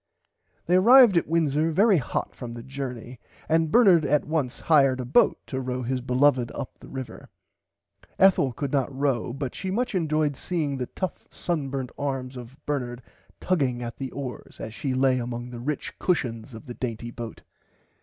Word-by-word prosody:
They 180 +2 +4
arrived 235 +1 +8
at 170 - +2
Windsor 160 -1 +1
very 195 +4 +4
hot 130 - -3
from 120 -2 -7
the 120 - -8
jorney 125 -2 -6 0.3
and 160 -1 +2
Bernard 195 -9 +6
at 145 +1 +2
once 150 -6 -2
hired 135 -5 +4
a 125 - -3
boat 125 - +4
to 130 -1 -4
row 125 0 -3
his 130 +1 -2
beloved 125 -1 +2
up 135 - -6
the - - -13
river. 130 -4 -8 0.9
Ethel 190 -8 +5
could 135 +3 -4
not 140 -2 0
row 135 -4 -1
but 135 0 -4
she 190 - -5
much 245 +6 -1
enjoyed 155 -5 +1
seeing 150 -3 -2
the 125 -1 -3
tough 185 -2 -5
sunburnt 135 -6 -3
arms 135 -2 -3
of 125 +1 -10
Bernard 125 -4 -3 0.4
tugging 135 -9 0
at 120 -1 -6
the 135 -1 -4
oars 130 -1 -7
as 110 - -6
she 130 +1 -2
lay 130 -1 +3
among 120 0 -5
the 120 - -7
rich 140 +4 -3
cushons 120 -9 -1
of 115 - -11
the 125 - -7
dainty 120 -1 -5
boat. 115 -1 -8
135 Hz, 175 wpm, -26 LUFS, 125-155 Hz, 0.9 s, arrived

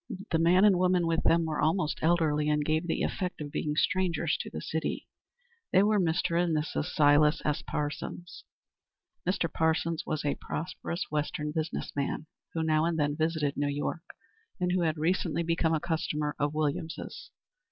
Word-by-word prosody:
The 165 - +2
man 180 +4 +5
and 195 -4 +5
woman 180 -1 +3
with 165 0 +1
them 165 0 +3
were 155 -2 -2
almost 160 0 +1
elderly 155 -2 +2
and 150 -1 +1
gave 155 +2 0
the - - 0
effect 180 -1 -2
of 145 -1 -6
being 150 0 -2
strangers 170 -2 +1
to - - -5
the 80 - -6
city. 160 - -3 0.6
They 190 - +5
were 210 0 +3
Mr. 170 0 +1
and 165 -3 +1
Mrs. 150 -1 -2
Silas 150 -2 +4
S. 150 -1 0
Parsons. 150 +3 -5 0.9
Mr. 185 -2 +1
Parsons 160 0 +1
was 155 -1 -3
a 145 - +2
prosperous 170 +1 -4
Western 150 0 -2
business 160 0 -3
man, 145 +2 -2 0.3
who 160 - 0
now 155 -1 +2
and 170 -1 0
then 145 -1 +1
visited 155 -2 0
New 145 0 0
York, 145 +3 -2 0.6
and 180 0 +1
who 180 0 +1
had 160 -2 +1
recently 170 +1 0
become 165 -1 +1
a - - 0
customer 150 -3 -2
of 145 +1 0
Williams's. 155 +1 -3
160 Hz, 175 wpm, -29 LUFS, 150-170 Hz, 0.9 s, man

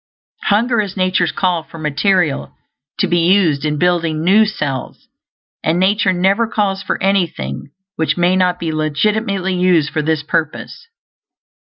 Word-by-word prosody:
Hunger 230 +3 +2
is 200 -2 -6
nature's 185 -2 +1
call 180 -4 0
for 165 - -14
material 155 +1 0 0.4
to - - +1
be 175 - +1
used 170 -5 +2
in 150 -1 -1
building 165 -2 0
new 205 +5 +5
cells, 140 - -5 0.6
and 160 +3 +1
nature 195 +1 +2
never 195 +5 +1
calls 200 -3 -1
for - - -3
anything 165 - -1 0.3
which 160 +2 0
may 175 +1 +2
not 180 -1 +1
be 165 -2 -2
legitimately 190 +5 -1
used 180 -4 +2
for 155 - -1
this 155 -1 -1
purpose. 160 - -3
180 Hz, 145 wpm, -17 LUFS, 155-195 Hz, 0.6 s, new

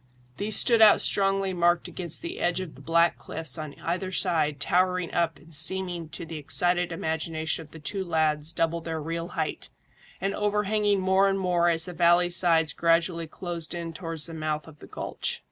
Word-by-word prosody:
These 210 +1 0
stood 230 -3 +4
out 215 -2 +8
strongly 195 -1 +1
marked 175 -1 +2
against 170 - -5
the 345 +2 -6
edge 175 +1 0
of 185 -5 -6
the 135 - -15
black 170 +3 +2
cliffs 160 -6 -2
on 155 -2 -7
either 185 +3 -3
side 155 -6 0
towering 180 +3 +1
up 170 -3 0
and 160 +3 -13
seeming 175 +1 0
to 165 - -7
the 160 -1 -7
excited 175 +4 +2
imagination 160 0 -2
of 160 - -13
the 160 - -12
two 190 +5 -4
lads 155 -3 +1
double 165 0 -1
their 160 -1 -4
real 165 +2 -4
height, - - -3 0.5
and 195 +1 -1
overhanging 210 -1 +1
more 190 +1 +3
and 195 - 0
more 175 -2 +2
as 165 0 +1
the 180 - -7
valley 175 +1 +3
sides 165 -4 +3
gradually 170 0 +1
closed 170 0 -4
in 170 -1 -5
towards 165 -2 -2
the 165 - -6
mouth 155 -1 -3
of 155 -2 -14
the - - -12
gulch. - - -3
170 Hz, 190 wpm, -26 LUFS, 160-185 Hz, 0.5 s, out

